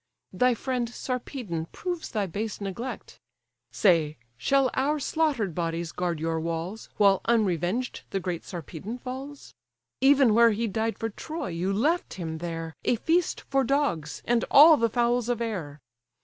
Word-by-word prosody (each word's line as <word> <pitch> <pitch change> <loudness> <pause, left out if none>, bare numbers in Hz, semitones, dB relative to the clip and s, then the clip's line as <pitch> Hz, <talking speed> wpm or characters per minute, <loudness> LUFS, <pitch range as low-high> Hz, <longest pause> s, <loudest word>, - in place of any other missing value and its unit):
Thy 250 -1 +3
friend 245 0 -2
Sarpedon 240 - -4
proves 350 -2 -4
thy 210 -3 -1
base 205 +4 -4
neglect; 220 +5 -6 0.5
Say, 165 -6 +3 0.2
shall 270 - +2
our 290 +3 +1
slaughter'd 280 - 0
bodies 165 0 -2
guard 175 -3 -2
your 165 0 -1
walls, 170 +6 -4
While 200 -2 +4
unreveng'd 215 +1 0
the 195 - -1
great 180 -2 -4
Sarpedon 180 - -7
falls? 265 +3 -8 0.5
Even 270 -3 +5
where 230 0 +6
he 230 +3 -1
died 220 +2 -1
for 225 - -2
Troy, 315 - -5
you 175 +3 -1
left 295 - 0
him 160 -3 -5
there, 165 -1 -5
A - - +2
feast 330 +8 +1
for 275 0 0
dogs, 245 - -1
and 235 -1 +2
all 310 +3 +9
the 230 -4 +1
fowls 240 +1 +1
of 240 -2 0
air. 180 -11 -4
225 Hz, 150 wpm, -27 LUFS, 175-255 Hz, 0.5 s, all